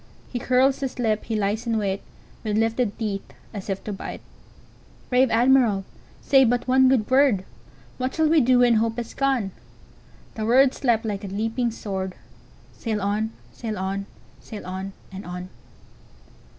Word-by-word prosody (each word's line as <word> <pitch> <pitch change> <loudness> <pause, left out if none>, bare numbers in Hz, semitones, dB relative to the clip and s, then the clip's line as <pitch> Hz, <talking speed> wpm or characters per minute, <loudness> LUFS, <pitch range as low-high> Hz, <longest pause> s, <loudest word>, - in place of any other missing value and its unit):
He 245 - -1
curls 260 +2 +3
his 270 -2 -4
lip, 220 -3 0
he 225 - -2
lies 210 +3 -1
in 225 -1 +1
wait, 195 -2 -1 0.4
With 215 -2 0
lifted 225 -1 +1
teeth, 205 -4 -2 0.3
as 200 -1 -7
if 195 0 -2
to 210 - -4
bite! 195 - -7 0.9
Brave 255 +1 +4
Admiral, 230 -4 +4 0.4
say 270 -1 +5
but 245 0 +1
one 260 0 +5
good 245 -5 +2
word:What 260 0 0
shall 320 -1 +3
we 315 0 +5
do 250 0 +4
when 240 -2 +5
hope 225 +1 0
is 235 -1 -5
gone?"The 235 -3 -5
words 260 +3 +4
leapt 235 -3 +2
like 205 -1 -3
a - - -4
leaping 225 +5 -1
sword:"Sail 205 +1 -6
on! 210 +2 -1 0.2
sail 220 -3 -5
on! 195 +1 -3 0.3
sail 215 - -9
on! 190 +1 -5 0.2
and 190 +1 -7
on!" 180 +1 -7
225 Hz, 150 wpm, -24 LUFS, 200-250 Hz, 0.9 s, say